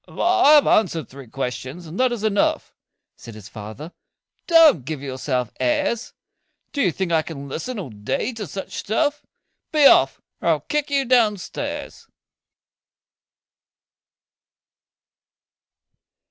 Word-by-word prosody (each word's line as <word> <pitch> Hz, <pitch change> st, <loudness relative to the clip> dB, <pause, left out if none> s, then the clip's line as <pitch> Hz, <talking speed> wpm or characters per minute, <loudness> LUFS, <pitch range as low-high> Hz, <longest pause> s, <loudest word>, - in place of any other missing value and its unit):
"I 355 Hz, -4 st, +3 dB
have 295 Hz, -2 st, +6 dB
answered 170 Hz, -, +2 dB
three 135 Hz, -1 st, -12 dB
questions, 130 Hz, +6 st, -5 dB
and 165 Hz, +3 st, -8 dB
that 255 Hz, -1 st, +3 dB
is 235 Hz, -3 st, -4 dB
enough," 205 Hz, -2 st, 0 dB, 0.4 s
Said 115 Hz, -, -11 dB
his 105 Hz, -2 st, -11 dB
father. 110 Hz, +10 st, -9 dB, 0.6 s
"Don't 325 Hz, -, +6 dB
give 155 Hz, +2 st, -5 dB
yourself 130 Hz, -3 st, -3 dB
airs! 215 Hz, -, -1 dB, 0.6 s
Do 285 Hz, -, -1 dB
you 185 Hz, -, +2 dB
think 185 Hz, +2 st, -3 dB
I 160 Hz, -1 st, +3 dB
can 140 Hz, -3 st, -8 dB
listen 220 Hz, -, -5 dB
all 175 Hz, -, -6 dB
day 105 Hz, -, -3 dB
to 220 Hz, -3 st, -6 dB
such 195 Hz, -, -7 dB
stuff? 290 Hz, +7 st, -1 dB, 0.5 s
Be 300 Hz, -2 st, +4 dB
off, -, -, +5 dB, 0.2 s
or -, -, -3 dB
I'll -, -, +3 dB
kick 300 Hz, -1 st, -2 dB
you 280 Hz, -1 st, +1 dB
down 235 Hz, -4 st, +3 dB
stairs. 290 Hz, +9 st, -7 dB
190 Hz, 130 wpm, -22 LUFS, -, 0.6 s, have